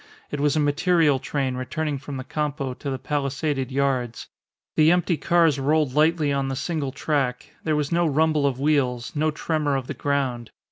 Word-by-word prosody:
It 145 - -3
was 145 0 +2
a - - +2
material 150 0 +3
train 135 -2 -2
returning 145 +3 -3
from 140 0 -7
the 130 - -5
Campo 145 -2 -3
to 140 - -6
the 135 - -2
palisaded 140 -1 -2
yards. 130 -4 -1 0.5
The 155 +1 +5
empty 175 0 +2
cars 160 -1 +3
rolled 150 0 +1
lightly 155 0 +3
on 140 -1 0
the 135 - -2
single 145 -1 -2
track; 135 -3 -1
there 155 -1 +1
was 150 -1 -1
no 170 0 +2
rumble 155 0 +2
of 130 -2 -2
wheels, 125 -5 0
no 155 +1 +2
tremor 150 -2 -1
of 135 -2 -2
the 145 - -5
ground. 130 -4 -1
145 Hz, 185 wpm, -24 LUFS, 135-155 Hz, 0.5 s, The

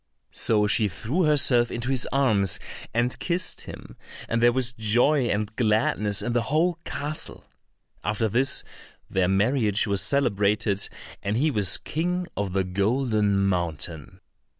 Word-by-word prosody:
So 105 -2 +1
she 105 +1 +2
threw 115 - -1
herself 130 -5 +4
into 120 +2 -3
his 130 -3 +1
arms 110 -9 +2 0.3
and 120 +2 0
kissed 180 +1 0
him, - - -11 0.3
and 115 0 -1
there 120 0 +6
was 125 0 -1
joy 120 +5 +2
and 105 0 -2
gladness 105 -2 0
in 120 - -2
the 120 - +2
whole 165 +8 0
castle. 150 +2 -4 0.6
After 110 +2 0
this 125 +6 +1 0.5
their 95 -2 +2
marriage 105 +2 +2
was 100 -3 +1
celebrated, 105 -6 +1 0.3
and 100 +2 -1
he 150 +4 +2
was 100 -6 +2
King 180 +3 -2
of 100 -3 -3
the 95 0 +1
Golden 100 +1 +1
Mountain. 85 -1 -3
110 Hz, 140 wpm, -25 LUFS, 100-130 Hz, 0.6 s, there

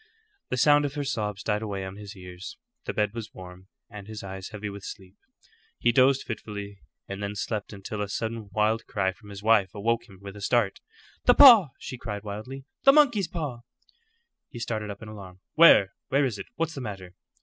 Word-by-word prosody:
The 125 - -1
sound 145 +2 +5
of 145 0 -4
her 145 - -2
sobs 105 -6 -3
died 105 -1 0
away 100 -3 -4
on 95 0 -7
his 105 +1 -10
ears. 90 - -9 0.3
The - - -3
bed 105 -1 0
was 115 -2 -7
warm, 90 0 -11 0.2
and 105 -1 -10
his 110 -1 -7
eyes 95 0 -7
heavy 105 -1 -6
with 100 -1 -8
sleep. 95 -1 -9 0.6
He 120 - +3
dozed 130 +2 +4
fitfully, 100 -3 -7 0.3
and 100 +1 -6
then 100 0 -3
slept 105 0 -3
until 105 +1 -6
a 100 - -3
sudden 110 0 -4
wild 110 +2 +1
cry 95 -2 0
from 105 +3 -16
his 100 0 -9
wife 110 -3 +3
awoke 115 +3 -1
him 95 - -14
with 100 0 -9
a 105 - -10
start. 110 -1 +1 0.5
"The - - +6
paw!" 235 - +10
she 130 - -8
cried 105 -3 -5
wildly. 110 +6 -7 0.2
"The 275 - +7
monkey's 240 - +4
paw!" 145 -8 -4 0.9
He - - -10
started 110 -2 -3
up 100 +1 -8
in - - -9
alarm. 95 -3 -11
"Where? 105 - +7
Where 140 +1 +2
is 115 -6 -3
it? 100 - -7
What's 165 0 -2
the 135 - -6
matter?" 95 -6 -7
105 Hz, 205 wpm, -27 LUFS, 100-120 Hz, 0.9 s, paw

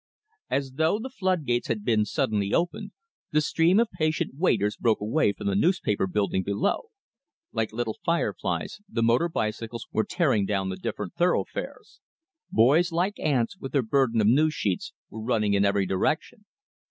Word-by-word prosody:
As 135 -1 -1
though 160 +5 +2
the 255 +4 -6
flood 185 - -1
gates 120 -1 0
had 105 -3 -2
been 110 -3 +2
suddenly 105 -1 0
opened, 200 +5 -1 0.4
the 155 - +2
stream 165 +6 +3
of 230 -1 +1
patient 155 0 -1
waiters 120 - +1
broke 115 -2 +1
away 110 +3 +1
from - - -9
the 100 - +1
newspaper 105 - +1
building 100 -1 0
below. 100 - -1 0.6
Like 110 -1 -1
little 110 -1 -3
fireflies, 170 +4 -1
the 115 - -1
motor 120 +9 +3
bicycles 115 -3 -3
were 110 - +1
tearing 130 - +1
down 95 -2 -1
the 95 - -3
different 95 - -5
thoroughfares. 175 +1 -2 0.5
Boys 150 +10 +4
like 180 +5 -1
ants, 145 +4 0
with 135 - -7
their 140 -3 +2
burden 120 -1 +2
of - - +2
news 150 +7 +3
sheets, 95 -4 -2 0.2
were 110 - -7
running 110 -3 +1
in 100 0 +3
every 100 -1 +2
direction. 155 - -1
120 Hz, 165 wpm, -26 LUFS, 105-165 Hz, 0.6 s, Boys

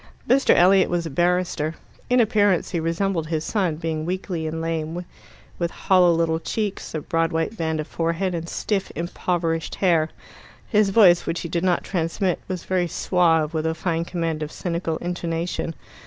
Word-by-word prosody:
Mr. 270 +2 +4
Elliot 185 +2 +5
was 175 -1 -1
a 165 - -5
barrister. 175 -1 0 0.3
In 250 0 +4
appearance 205 -5 +2
he 175 - 0
resembled 165 0 -1
his 160 -1 -1
son, 185 -4 0
being 160 -1 -3
weakly 175 -1 -3
and 160 +1 -3
lame, 165 +1 -3 0.5
with 170 -1 0
hollow 180 0 +3
little 165 -1 +1
cheeks, 205 0 -3
a 155 - -2
broad 165 +2 0
white 165 +6 -1
band 160 -5 -1
of 155 - -2
forehead, 170 +4 -1
and 170 0 -4
stiff 200 -3 -2
impoverished 170 -1 -2
hair. 165 -4 +2 0.6
His 210 -3 +3
voice, 190 -4 +5
which 165 - -1
he 170 - -5
did 170 +1 -1
not 180 -2 +2
transmit, 175 +1 -1
was 185 -2 -4
very 180 -2 0
suave, 165 -2 +2
with 160 0 -1
a 160 - -1
fine 165 0 -1
command 165 -3 -3
of 150 0 -4
cynical 170 -2 -2
intonation. 170 -1 -3
170 Hz, 170 wpm, -23 LUFS, 165-185 Hz, 0.6 s, Elliot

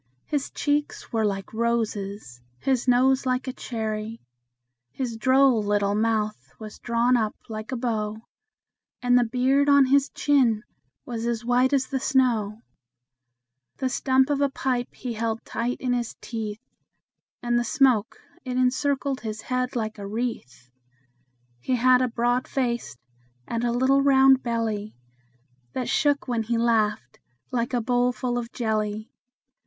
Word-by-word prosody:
His 290 -2 -2
cheeks 290 -2 -2
were 225 -1 +1
like 195 -1 -2
roses, 210 - -2 0.2
his 260 - 0
nose 260 +2 +3
like 255 +1 0
a 260 - -3
cherry; 220 -2 -4 0.7
His 245 - -4
droll 260 0 +4
little 205 -1 +1
mouth 215 - -1
was 215 -1 -10
drawn 240 +1 +2
up 220 -3 0
like 215 +2 -6
a 255 - -2
bow, 220 -3 -2 0.9
And 245 0 +4
the 245 - +5
beard 260 +4 +2
on 280 -1 +6
his 275 +1 +3
chin 250 -7 +2 0.4
was 235 -4 -4
as 235 -1 -2
white 250 +2 +3
as 270 -2 +2
the 265 - -3
snow; 235 -6 +1 1.1
The 260 -2 -1
stump 265 +1 +2
of 285 -1 0
a 280 - +3
pipe 250 -2 -2
he 245 -2 -5
held 225 0 -3
tight 240 +2 -2
in 250 -1 0
his 240 -2 -2
teeth, 220 -2 -5 0.8
And 240 0 +2
the - - 0
smoke, 230 -1 +2 0.3
it 255 -2 -3
encircled 265 +1 0
his 220 -1 -5
head 255 +1 -2
like 220 -2 -3
a 200 - -6
wreath. 205 - -5 0.9
He 250 - -1
had 250 +1 +4
a 255 - +2
broad 245 +1 0
face, 240 - -2 0.5
and 230 0 -2
a 240 - +1
little 260 +3 +3
round 270 -1 +5
belly 225 -3 -2 0.8
That 250 - -3
shook 290 -2 +1
when 240 -2 0
he 230 +1 -1
laughed, 215 - 0 0.3
like 240 0 -1
a 240 - +1
bowl 245 +1 +2
full 245 -1 -2
of 235 0 -7
jelly. 215 -2 -2
240 Hz, 150 wpm, -25 LUFS, 220-260 Hz, 1.1 s, on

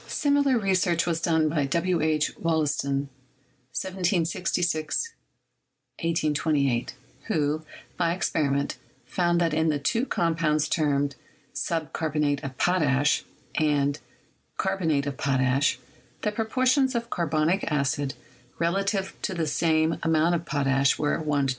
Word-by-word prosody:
Similar 285 -3 +2
research 185 -5 +1
was 165 -1 -1
done 160 -2 +2
by 150 -2 0
W. 170 +3 +1
H. 155 -1 +1
Wollaston 145 -4 0 0.6
(1766 180 - -1 0.9
1828), 150 -6 0 0.3
who, 150 0 0 0.3
by 170 -2 +2
experiment, 140 -5 0 0.3
found 175 +5 +1
that 165 -2 +1
in 160 +1 +2
the 150 - +1
two 230 - 0
com 165 -1 0
pounds 155 -2 +1
termed 145 -3 +1 0.4
"subcarbonate 150 -3 -1
of 130 -2 -6
potash" 150 -5 +2 0.3
and 145 -1 +1 0.6
"carbon 190 -3 0
ate 140 -1 +1
of 140 -2 -4
potash," 130 -1 +2 0.5
the 210 - +1
proportions 255 +5 +1
of 235 0 -2
carbonic 160 +2 +1
acid 140 -1 0 0.5
relatively 195 +3 0
to 200 - -2
the 165 -2 0
same 160 +1 +2
amount 160 +1 +3
of 170 0 -3
potash 140 -2 +2
were 150 - +1
as 160 - -6
1:2. 145 -2 +1
160 Hz, 120 wpm, -26 LUFS, 145-175 Hz, 0.9 s, amount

